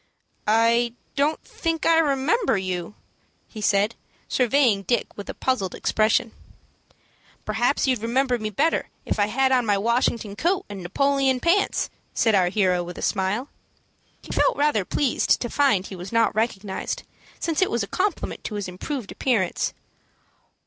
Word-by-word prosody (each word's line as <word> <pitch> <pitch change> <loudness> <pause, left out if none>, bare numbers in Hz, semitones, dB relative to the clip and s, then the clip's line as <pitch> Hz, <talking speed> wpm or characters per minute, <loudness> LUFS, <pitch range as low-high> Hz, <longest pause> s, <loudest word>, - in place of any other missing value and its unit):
"I 230 +2 +3 0.2
don't 295 +3 +1
think 330 -1 -3
I 330 0 +5
remember 295 - +2
you," 185 0 -4 0.5
he 215 - -9
said, 205 +2 +2 0.3
surveying 250 -5 +3
Dick 240 +5 -1
with 205 - -8
a - - -5
puzzled 230 -9 -1
expression. 220 +1 +1 1.1
"Perhaps 235 +6 +1
you'd 255 -5 +1
remember 245 +2 +1
me 215 -1 -3
better 295 - 0 0.2
if - - -2
I 205 - +3
had 265 +4 +1
on 255 -1 +3
my 205 -3 +2
Washington 230 -1 0
coat 350 - 0
and 200 -2 -7
Napoleon 270 +7 +1
pants," 350 +8 +1 0.2
said 225 - +3
our 185 -3 +4
hero, 185 -3 +1
with 175 0 -8
a - - -6
smile. 205 +7 -1 0.7
He - - -9
felt - - +2
rather 285 -10 +2
pleased 275 +4 +1
to 240 - -4
find 265 -10 +2
he 195 - -8
was 180 +1 -8
not 230 0 +3
recognized, 210 -3 -2 0.4
since 330 0 -1
it 375 - +3
was 235 -2 0
a - - -5
compliment 395 - -2
to 215 - -4
his 205 -2 -3
improved 205 - -5
appearance. 220 -9 0
230 Hz, 155 wpm, -24 LUFS, 200-275 Hz, 1.1 s, I